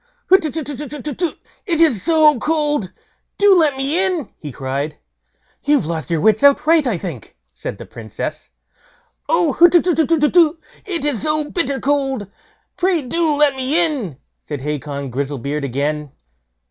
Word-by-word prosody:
"Hutetutetutetu! 300 Hz, -2 st, -1 dB, 0.3 s
it 335 Hz, -4 st, 0 dB
is 295 Hz, -, +4 dB
so 310 Hz, -4 st, +4 dB
cold; 295 Hz, -, -1 dB, 0.5 s
do 400 Hz, -1 st, +5 dB
let 305 Hz, -6 st, +3 dB
me 290 Hz, +7 st, +1 dB
in", 360 Hz, -, -1 dB
he 150 Hz, -, -7 dB
cried. 140 Hz, +3 st, -4 dB, 0.7 s
"You've 290 Hz, -, +2 dB
lost 160 Hz, 0 st, -4 dB
your 165 Hz, -2 st, 0 dB
wits 215 Hz, +2 st, +3 dB
outright, 300 Hz, +1 st, +4 dB
I 220 Hz, -7 st, 0 dB
think", 160 Hz, -, -8 dB, 0.2 s
said -, -, -6 dB
the -, -, -9 dB
Princess. 110 Hz, -, -7 dB, 0.8 s
"Oh, 175 Hz, -, +2 dB
hutetutetutetu! 335 Hz, -1 st, +4 dB, 0.3 s
it 335 Hz, -6 st, -2 dB
is 285 Hz, -7 st, -1 dB
so 305 Hz, -1 st, -1 dB
bitter 280 Hz, -6 st, -1 dB
cold, 270 Hz, -5 st, -1 dB, 0.5 s
pray 365 Hz, -4 st, +1 dB
do 315 Hz, +4 st, 0 dB
let 290 Hz, -2 st, +3 dB
me 280 Hz, +6 st, +1 dB
in", 240 Hz, -, -4 dB, 0.2 s
said 145 Hz, -3 st, -6 dB
Hacon 140 Hz, -1 st, -4 dB
Grizzlebeard 140 Hz, +2 st, -3 dB
again. 145 Hz, +2 st, -2 dB
280 Hz, 135 wpm, -19 LUFS, -, 0.8 s, do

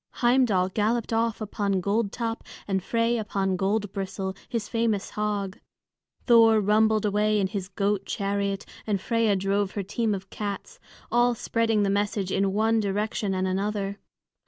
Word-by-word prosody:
Heimdal 240 Hz, -7 st, +3 dB
galloped 225 Hz, +4 st, 0 dB
off 225 Hz, 0 st, 0 dB
upon 200 Hz, -2 st, -1 dB
Goldtop 225 Hz, +4 st, -1 dB, 0.3 s
and 190 Hz, -1 st, 0 dB
Frey 230 Hz, +4 st, +1 dB
upon 195 Hz, -3 st, -1 dB
Goldbristle, 195 Hz, -1 st, -2 dB
his 230 Hz, -4 st, -2 dB
famous 225 Hz, -4 st, -1 dB
hog; 205 Hz, -2 st, -2 dB, 0.7 s
Thor 225 Hz, -2 st, +6 dB
rumbled 215 Hz, +1 st, +3 dB
away 210 Hz, +1 st, +2 dB
in 195 Hz, -, +2 dB
his 190 Hz, -1 st, -3 dB
goat 200 Hz, 0 st, -1 dB
chariot, 200 Hz, -1 st, -1 dB, 0.2 s
and 205 Hz, -2 st, +1 dB
Freia 225 Hz, 0 st, +1 dB
drove 195 Hz, +1 st, 0 dB
her 200 Hz, -, -2 dB
team 215 Hz, +2 st, -1 dB
of 190 Hz, 0 st, -9 dB
cats, 210 Hz, -, -5 dB, 0.3 s
all 240 Hz, 0 st, +3 dB
spreading 225 Hz, -2 st, +1 dB
the 195 Hz, -, +1 dB
message 200 Hz, -1 st, -1 dB
in 195 Hz, 0 st, +1 dB
one 220 Hz, +3 st, +2 dB
direction 205 Hz, -1 st, -1 dB
and 185 Hz, 0 st, 0 dB
another. 200 Hz, +1 st, -2 dB
205 Hz, 145 wpm, -26 LUFS, 195-225 Hz, 0.7 s, Thor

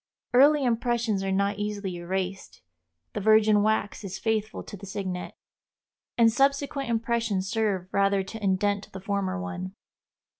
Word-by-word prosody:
Early 285 Hz, +3 st, +6 dB
impressions 235 Hz, -4 st, 0 dB
are 195 Hz, -, -1 dB
not 200 Hz, +1 st, 0 dB
easily 205 Hz, -3 st, -3 dB
erased; 185 Hz, -, -4 dB, 0.5 s
the -, -, -2 dB
virgin 215 Hz, 0 st, +5 dB
wax 215 Hz, 0 st, 0 dB
is 195 Hz, -1 st, -5 dB
faithful 220 Hz, -1 st, -2 dB
to -, -, -9 dB
the 200 Hz, 0 st, -10 dB
signet, 185 Hz, -2 st, -4 dB, 0.8 s
and 230 Hz, -2 st, +5 dB
subsequent 275 Hz, 0 st, +1 dB
impressions 225 Hz, -4 st, 0 dB
serve 200 Hz, -4 st, 0 dB
rather 200 Hz, 0 st, +2 dB
to 210 Hz, +3 st, -8 dB
indent 200 Hz, +1 st, 0 dB
the 190 Hz, -, -6 dB
former 195 Hz, -1 st, -2 dB
one. 185 Hz, 0 st, -5 dB
205 Hz, 140 wpm, -27 LUFS, 190-225 Hz, 0.8 s, Early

